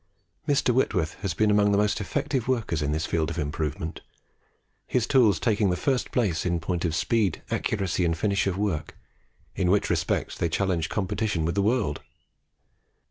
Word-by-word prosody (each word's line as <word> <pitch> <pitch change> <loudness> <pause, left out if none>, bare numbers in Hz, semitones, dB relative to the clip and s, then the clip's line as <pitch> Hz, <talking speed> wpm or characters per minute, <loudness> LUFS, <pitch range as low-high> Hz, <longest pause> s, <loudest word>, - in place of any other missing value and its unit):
Mr. 140 -3 +2
Whitworth 90 -10 +1
has 100 -3 -2
been 110 -1 +3
among 105 0 +4
the 100 - +3
most 105 +1 +1
effective 130 +4 -2
workers 110 - 0
in 75 0 0
this 80 +1 -1
field 80 -2 0
of - - -5
improvement, 75 +1 -3 0.9
his 125 -3 +1
tools 120 -7 +4
taking 105 -3 +2
the 90 - +1
first 130 +6 0
place 100 -10 0
in 85 -1 0
point 90 0 -2
of 80 -1 0
speed, 105 +2 0
accuracy, 95 -4 0
and 85 -1 +1
finish 100 +2 +1
of 95 -1 -1
work, 95 -7 -2 0.6
in 90 - +1
which 100 +2 +2
respects - - -1
they 85 - -1
challenge 85 -2 0
competition 100 -3 -1
with 85 - 0
the 100 - +1
world. 105 - 0
95 Hz, 175 wpm, -26 LUFS, 85-110 Hz, 0.9 s, among